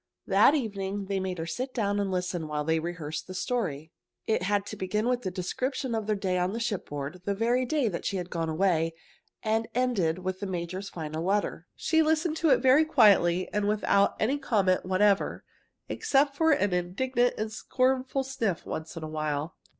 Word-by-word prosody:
That 205 +9 +5
evening 200 -6 -3
they 195 0 -1
made 185 -1 -3
her 165 - -3
sit 255 +9 -4
down 205 -3 0
and 200 -1 0
listen 180 -3 -2
while 150 -1 -2
they 160 +1 +1
rehearsed 165 -2 -5
the 185 - -7
story. 160 - -2 0.3
It 220 - +1
had 200 +1 0
to - - -6
begin 210 +4 -1
with 250 0 +1
the 190 - -2
description 250 +8 -3
of 220 -2 -2
their 215 - +2
day 185 -2 -1
on 185 +5 -1
shipboard, 180 -8 -4
the 200 - 0
very 240 +4 +1
day 290 -3 +1
that 175 -5 -3
she 195 - -1
had 180 0 -5
gone 165 -2 -2
away, 165 -1 +1 0.5
and 220 +1 0
ended 215 -10 +1
with 185 0 -4
the 200 - -4
major's 185 +2 -4
final 160 -1 -5
letter. 195 -2 -1
She 320 0 +2
listened 315 +1 +1
to 325 - +2
it - - +7
all - - -2
very 265 +4 +6
quietly 185 - +4
and 205 -1 +1
without 205 -1 +2
any 270 +6 +1
comments 190 -9 +1
whatever, 195 +2 +2 0.4
except 280 -9 +1
for 320 +2 +3
an 205 -10 +2
indignant 240 +8 0
and 215 0 -3
scornful 260 +3 0
sniff 230 -10 -2
once 160 +1 -6
in 165 - -5
a - - -4
while. 155 0 -3
200 Hz, 195 wpm, -28 LUFS, 175-245 Hz, 0.5 s, it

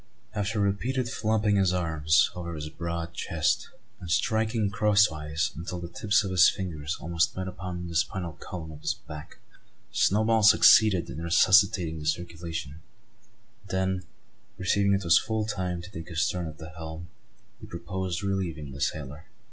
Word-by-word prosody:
After 105 +1 -2
repeated 120 +6 0
flopping 110 -3 +1
his 95 -2 +3
arms 80 -3 +2
over 85 -2 -6
his 75 0 -5
broad 85 +1 -5
chest, 80 -5 -1 0.3
and 90 - -9
striking 110 +3 +1
crosswise, 80 -8 +2
until 85 +3 -5
the 85 - -6
tips 105 +2 +1
of 95 - -4
his 90 -2 +7
fingers 80 -4 -4
almost 85 +7 0
met 95 0 -3
upon 90 -1 -6
the 85 - -7
spinal 85 0 -1
column 80 -1 -8
of 75 - -11
his - - -1
back, 75 0 -11 0.5
Snowball 110 +2 +3
succeeded 105 -2 +6
in 80 - -6
resuscitating 85 -1 +4
the 75 - -6
circulation; 80 -2 -4 0.8
and 100 - -19
then, 95 -1 -1 0.5
perceiving 100 +2 +2
it 100 - -2
was 85 -2 +5
full 110 -1 -2
time 90 -4 -3
to 95 - -11
take 80 -3 -8
his 80 -1 +1
turn 90 -2 -3
at 80 0 -9
the 80 - -9
helm, 80 +1 -8 0.5
he - - -11
proposed 90 +2 -4
relieving 85 -8 -3
the 70 +1 -9
sailor. 75 +2 -3
90 Hz, 160 wpm, -27 LUFS, 80-100 Hz, 0.8 s, his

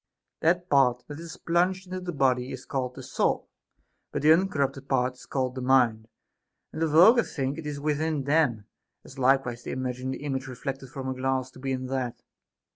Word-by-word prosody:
That 175 +2 +2
part 125 -5 +3
that 145 +1 -8
is 170 +1 -8
plunged 180 +3 +1
into 185 0 -5
the 180 -1 -4
body 130 -4 +1
is 130 -1 -7
called 125 -2 -3
the 130 - -8
soul, 130 - -1 0.6
but - - -3
the 155 +1 +8
uncorrupted 140 -6 0
part 130 -1 +2
is 125 - -16
called 130 -2 -1
the 130 - -5
mind, 125 -4 +3 0.7
and 155 - -5
the 165 - +3
vulgar 180 +11 +7
think 140 -6 -3
it 155 - -6
is 145 -1 -4
within 150 0 0
them, 140 -7 +2 0.4
as 135 - -12
likewise 130 -2 +2
they - - -8
imagine 130 0 -3
the 130 - -5
image 135 -2 -3
reflected 135 +1 -5
from 135 -1 -6
a 130 - -1
glass 130 0 -1
to 130 - -14
be 135 +1 -3
in 130 0 -2
that. 130 -2 -3
135 Hz, 200 wpm, -27 LUFS, 130-155 Hz, 0.7 s, the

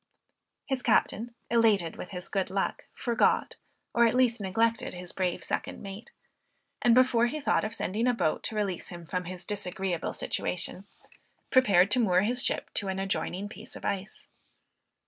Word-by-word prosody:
His 265 -2 -1
captain 230 0 +1 0.2
elated 215 -8 +3
with - - -7
his 180 -1 -4
good 195 -2 -1
luck, 195 +1 -2
forgot, 235 -2 +1 0.4
or 235 0 +5
at 230 - 0
least 245 -3 +3
neglected 225 +2 0
his 180 -1 -7
brave 180 -2 -2
second - - -3
mate; 195 +3 -9 0.7
and 235 -1 +5
before 250 -2 +4
he 305 +6 -3
thought 285 - +1
of 220 +1 -2
sending 225 +4 -1
a 250 - +4
boat 160 -8 0
to 220 - -3
release 200 -4 -2
him 175 -1 -9
from 180 +2 -3
his 180 0 -7
disagreeable 190 -3 -3
situation, 180 +2 0 0.7
prepared 200 -7 +5
to 255 - +4
moor 185 -6 +4
his 245 +5 +1
ship - - 0
to 200 - -1
an 190 0 -2
adjoining 195 0 -2
piece - - -11
of - - -9
ice. 195 +1 -4
200 Hz, 165 wpm, -29 LUFS, 185-235 Hz, 0.7 s, or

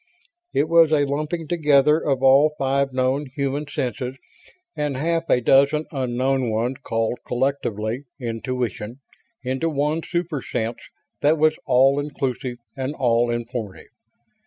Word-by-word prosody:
It 145 - +1
was 165 -1 +5
a 145 -2 +3
lumping 155 +3 -3
together 150 -2 +4
of 135 -2 0
all 140 +3 +5
five 135 0 +1
known 130 +3 0
human 140 +1 -2
senses 130 -2 -3 0.6
and 145 -3 -2
half 165 +3 -1
a - - +4
dozen 140 +5 +4
unknown 130 -1 0
ones 115 +4 -1
called, 115 +1 -1
collectively, 125 -2 -2
"intuition" 120 -2 -3 0.5
into 130 +5 -1
one 150 +2 0
super 170 -4 -3
sense 115 -1 -3 0.4
that 150 +3 +3
was 155 0 +4
all 135 +2 +4
inclusive 135 -4 -3 0.2
and 135 +2 -3
all 120 -1 +2
informative. 115 -6 -5
135 Hz, 130 wpm, -22 LUFS, 125-150 Hz, 0.6 s, was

